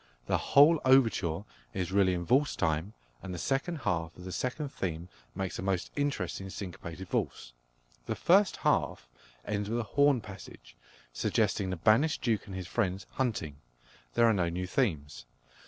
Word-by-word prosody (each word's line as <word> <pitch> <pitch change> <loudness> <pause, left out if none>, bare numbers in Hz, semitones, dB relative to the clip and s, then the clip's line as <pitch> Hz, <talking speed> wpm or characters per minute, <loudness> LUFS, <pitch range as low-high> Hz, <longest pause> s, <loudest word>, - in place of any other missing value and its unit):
The - - +1
whole 150 +3 +5
overture 115 -10 +3 0.3
is 90 -1 -2
really 95 -2 +3
in 85 0 -3
valse 135 - +3
time, 80 +4 -1 0.3
and 95 - -7
the 90 - -4
second 135 - -1
half 85 -5 -2
of 90 - -11
the 95 - -6
second 135 - -3
theme 85 -6 -4 0.3
makes 95 -1 -3
a - - -2
most 95 -2 -1
interesting 95 -10 -2
syncopated 90 -1 -7
valse. - - -2 0.5
The - - -1
first 195 +2 +4
half - - +1 0.4
ends 105 0 -2
with 115 - 0
a 120 - 0
horn 140 -2 +4
passage, 95 - -12 0.4
suggesting 95 +9 0
the 95 - -1
banished 110 - +3
Duke 110 -4 0
and 95 - -7
his 95 -1 -5
friends 95 -1 -1
hunting. 100 - -2 0.6
There 120 - +5
are 115 - +5
no 90 -4 +1
new 90 +2 -3
themes. 75 - -2
95 Hz, 165 wpm, -30 LUFS, 85-125 Hz, 0.6 s, whole